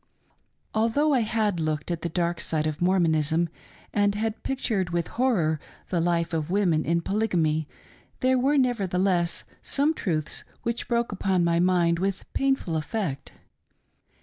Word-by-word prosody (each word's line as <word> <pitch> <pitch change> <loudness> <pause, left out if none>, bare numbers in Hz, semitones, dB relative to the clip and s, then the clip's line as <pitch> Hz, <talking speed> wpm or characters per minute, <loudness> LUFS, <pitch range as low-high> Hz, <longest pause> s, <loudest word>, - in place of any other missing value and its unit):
Although 230 +8 +2
I 260 - +4
had 215 -5 0
looked 155 0 -2
at 170 -2 -2
the 170 - -2
dark 170 0 -1
side 155 -1 0
of 155 0 -3
Mormonism 165 -2 +2 0.4
and 205 -1 +2
had 220 +1 -2
pictured 225 -8 -1
witk 170 -1 -2
horror 190 - +1 0.3
the 180 - 0
life 170 0 0
of 155 -1 -1
women 175 -5 +2
in 170 +1 +1
Polygamy, 170 -7 0 0.5
there 260 -1 +3
were 280 +4 +3
nevertheless 190 -8 +1 0.2
some 290 +3 +1
truths 155 - -2 0.2
which 235 0 -2
broke 235 -1 0
upon 190 -2 +1
my 170 0 +2
mind 175 -2 +3
with 190 0 -2
painful 270 -11 0
effect. 155 -3 -3
180 Hz, 145 wpm, -26 LUFS, 165-225 Hz, 0.5 s, I